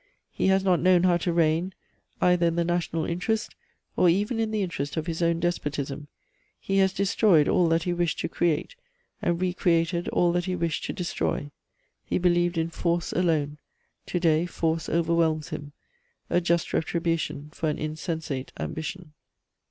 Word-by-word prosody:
He - - 0
has 190 0 +3
not 185 -3 +3
known 180 0 +4
how 180 -2 +4
to 175 +1 -1
reign 170 +2 +1 0.4
either 180 -1 +3
in 165 - 0
the 170 - +2
national 170 -2 -1
interest 215 +6 -2 0.4
or 180 - +4
even 205 +7 +1
in 225 -1 0
the 215 -2 0
interest 155 -4 -4
of 155 - -1
his 165 -1 -3
own 170 0 +2
despotism. 145 -4 -2 0.5
He 195 0 0
has 190 -1 +4
destroyed 195 -5 +3
all 175 - +3
that 165 0 +2
he 175 - -1
wished 175 -1 0
to - - -1
create, 170 - -1 0.5
and 170 -1 0
re 185 -1 0
created 170 -1 +1
all 175 -1 +2
that 175 0 0
he 185 -1 -1
wished 170 -3 -2
to - - -3
destroy. 170 -5 -2 0.5
He - - -1
believed 175 -1 +2
in 165 +1 0
force 170 0 -1
alone; 150 -4 0 0.5
to 175 - -1
day 165 0 +2
force 165 -2 -1
overwhelms 165 -2 +1
him: 145 0 -6 0.6
a 175 - +3
just 170 -1 0
retribution 165 -3 -1
for 160 - -1
an 150 - -2
insensate 155 -3 -4
ambition." 160 0 -5
170 Hz, 170 wpm, -26 LUFS, 160-180 Hz, 0.6 s, known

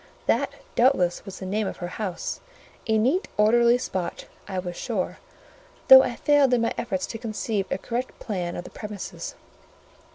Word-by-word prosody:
that, - - +1 0.2
doubtless, 235 -9 +3
was 195 -2 -8
the 190 - -7
name 205 +2 -1
of - - -5
her 175 - -4
house: 185 -5 -3 0.5
a 220 -1 +3
neat 265 - +2
orderly 235 +3 +5
spot, 190 -7 -4 0.2
I 190 - -4
was 180 -1 -4
sure; 215 -4 -3 0.7
though 265 0 +12
I 245 -2 -2
failed 285 -3 +4
in 235 - +1
my 230 - +1
efforts 190 -6 -2
to 225 - -7
conceive 215 -3 -2
a - - -1
correct 245 +5 -4
plan 180 -5 -3
of 175 - -5
the - - -11
premises. 210 -3 -7
215 Hz, 170 wpm, -25 LUFS, 185-240 Hz, 0.7 s, though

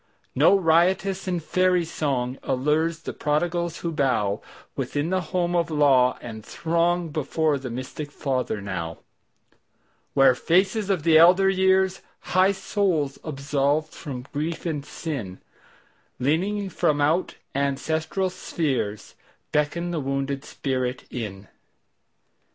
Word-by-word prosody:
No 200 - +5
riotous 185 +3 +2
and 175 -3 -1
fairy 185 +1 +2
songAllures 150 +3 -1
the - - -5
prodigals 170 +3 -1
who 170 -1 -2
bowWithin 135 - -2
the 185 0 +1
home 175 -1 0
of 170 -1 +1
law, 135 -5 +4
and 110 -2 -8
throngBefore 165 -3 0
the 130 - -5
mystic 130 +5 -6
Father 130 -7 -2
now, 90 -4 -4 1.2
Where 135 -2 +6
faces 190 - +1
of 185 -6 +1
the 160 -1 +6
elder 185 +3 +6
years, 190 0 +2 0.3
High 185 +2 +5
souls 185 -8 -1
absolved 145 +1 -1
from 130 -5 -7
grief 155 +4 -3
and 150 -4 -2
sin, 135 - -5 0.8
Leaning 190 +9 0
from 150 -2 +1
out 155 +5 +1 0.2
ancestral 160 +7 -1
spheresBeckon 150 - -3
the 165 - -1
wounded 135 0 -2
spirit 130 -2 -2
in. 105 -5 -6
155 Hz, 110 wpm, -24 LUFS, 135-175 Hz, 1.2 s, Where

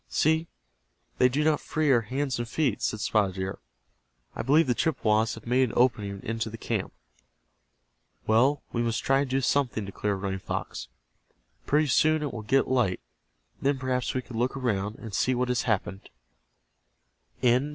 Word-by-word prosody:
"See, 160 +2 +2 0.7
they 125 - +6
do 145 +4 0
not 155 -1 +2
free 155 -2 0
our 120 -3 +5
hands 130 +3 -2
and 120 -1 -4
feet," 135 -6 0
said 110 - -1
Spotted 100 -5 +1
Deer. 95 0 -4 0.8
"I - - -2
believe 150 +7 +4
the 125 - +2
Chippewas 110 -8 +1
have 110 - -12
made 125 +1 +2
an - - -8
opening 105 -6 +1
into 115 0 -2
the 115 - -8
camp." - - -3 1.3
"Well, 130 +6 +3
we 120 - 0
must 115 -1 -1
try 135 0 +3
to 140 - 0
do 135 +1 +1
something," 125 -5 0
declared 100 0 -2
Running 95 -1 -2
Fox. - - -5 0.8
"Pretty 150 +2 +3
soon 155 +3 +3
it 145 - -3
will 115 - -5
get 135 +6 +2
light. 120 -8 +1 0.6
Then 140 0 +1
perhaps 125 -1 -2
we 130 - -1
can 115 -2 -6
look 130 +3 0
around, 105 -5 -1
and 110 -3 -9
see 130 +6 +1
what 125 0 0
has 125 -1 0
happened." 95 -2 -2
125 Hz, 170 wpm, -27 LUFS, 110-135 Hz, 1.3 s, they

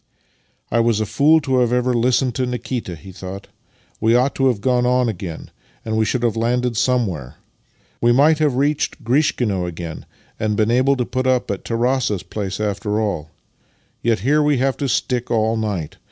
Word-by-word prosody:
" - - -43
I 115 - +2
was 115 -2 +2
a 110 - 0
fool 145 +9 +4
ever 130 -3 +2
to - - +2
have 125 - 0
listened 125 +1 +2
to 130 +1 -1
Nikita," 125 -6 -4
he 95 +4 -12
thought. 95 +1 -8 0.2
" - - -36
We 115 +1 +4
ought 130 +3 +2
to 135 - +2
have 120 -6 +1
gone 125 +3 +1
on 125 0 +2
again, 90 -6 -6 0.3
and 110 -1 -2
we 110 0 +2
should 125 +2 -1
have 115 -2 +1
landed 120 +1 0
somewhere. 105 - 0 0.7
We 120 - +4
might 150 +5 +4
have 150 -4 +2
reached 145 +1 0
Grishkino 115 - +1
again, 85 -2 -7 0.3
and 105 -1 -1
been 110 +1 +2
able 130 +3 +3
to 125 -2 -1
put 130 +1 -2
up 130 -4 +1
at 100 - -4
Tarass's 115 -4 0
place 95 0 -5
after 105 0 -1
all. 90 -8 -2 0.7
Yet 115 -4 +1
here 145 +6 +3
we 150 -2 +2
have 135 +1 +1
to 140 - -2
stick 125 -1 -1
all 110 -1 +1
night! 105 -8 -3
120 Hz, 195 wpm, -20 LUFS, 105-130 Hz, 0.7 s, fool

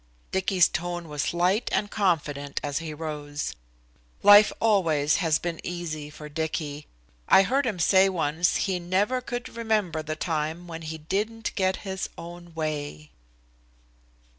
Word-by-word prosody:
Dicky's 190 -1 +3
tone 175 +1 -4
was 150 -1 -2
light 180 +6 +1
and 205 - 0
confident 150 -8 0
as 145 0 -1
he 165 -2 -5
rose. 150 -2 -4 0.7
Life 205 +1 +9
always 165 -9 +3
has 165 -5 +2
been 170 -1 -4
easy 160 -4 -4
for 150 0 -10
Dicky. 150 -1 -4 0.4
I 190 - +8
heard 260 +6 +1
him 215 -5 -1
say 190 +3 +5
once 165 -1 +1
he 190 -2 0
never 195 +9 0
could 245 0 -5
remember 215 -9 -1
the 155 0 -4
time 160 +1 -2
when 165 -1 -7
he 160 0 -5
didn't 210 +8 -2
get 190 -1 +1
his 190 -1 -3
own 175 0 -10
way. 145 - -4
170 Hz, 140 wpm, -26 LUFS, 155-195 Hz, 0.7 s, Life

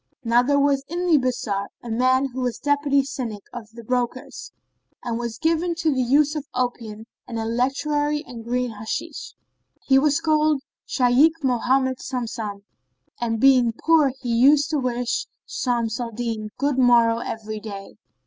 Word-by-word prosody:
Now 235 +1 +4
there 285 +3 +2
was 280 -1 +2
in 350 +3 -3
the 325 -4 +4
bazar 215 -6 -2 0.2
a 235 - -6
man 255 +3 +2
who 260 - -4
was 245 -2 -1
Deputy 285 +1 +1
Syndic 235 -7 -5
of 225 -3 -8
the 235 0 -10
brokers 250 +1 -3 0.5
and 235 -1 -3
was 235 -2 -4
given 330 +3 0
to 325 -3 +1
the 260 - 0
use 285 +4 +3
of 295 -2 -5
opium 230 -3 -3 0.2
and 230 - -5
electuary 285 +6 0
and 230 -2 -9
green 245 +1 -1
hashish.[FN#28] 215 0 -6 0.5
He 270 -1 +5
was 290 0 +2
called 305 -2 +2 0.2
Shaykh 285 +6 +3
Mohammed 260 +1 +1
Samsam 225 -5 -5 0.6
and 225 -2 -1
being 255 -2 +5
poor 315 -4 +4
he 240 -2 -1
used 280 +6 +4
to 305 - +1
wish 245 -1 -2 0.2
Shams 235 -3 -2
al 240 -1 -3
Din 225 -2 -4
good 280 0 0
morrow 235 -2 +4
every 215 -2 -5
day. 200 -2 -8
250 Hz, 160 wpm, -23 LUFS, 230-285 Hz, 0.6 s, He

